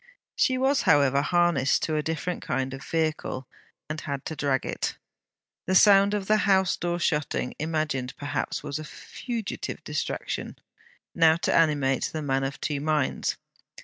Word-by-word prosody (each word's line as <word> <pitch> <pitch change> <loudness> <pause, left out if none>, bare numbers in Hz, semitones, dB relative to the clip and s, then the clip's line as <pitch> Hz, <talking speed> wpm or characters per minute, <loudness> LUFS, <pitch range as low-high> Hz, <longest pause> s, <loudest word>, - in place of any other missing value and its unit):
She 255 - +2
was, 270 +2 +2
however, 140 -2 +4
harnessed 170 -4 +2
to 155 - 0
a 150 - +1
different 160 +3 -3
kind 130 0 -2
of 135 +1 -8
vehicle, 155 -5 -2 0.4
and 155 0 -4
had 140 -2 -5
to 160 - -4
drag 140 -3 0
it. - - -3 0.7
The 185 - +1
sound 200 +1 +6
of 200 -2 -2
the 215 +2 +3
house 190 -3 +3
door 175 0 -2
shutting, 150 -5 -1
imagined 155 -5 -2
perhaps, 145 0 -3
was 140 - -4
a - - -6
fugitive 230 - -6
distraction. - - -4 0.6
Now 160 -2 +5
to 170 - 0
animate 145 -5 +2
The 155 -1 -4
Man 135 -1 0
of 135 +2 -4
Two 145 -2 -2
Minds! 150 -2 0
155 Hz, 155 wpm, -26 LUFS, 140-175 Hz, 0.7 s, sound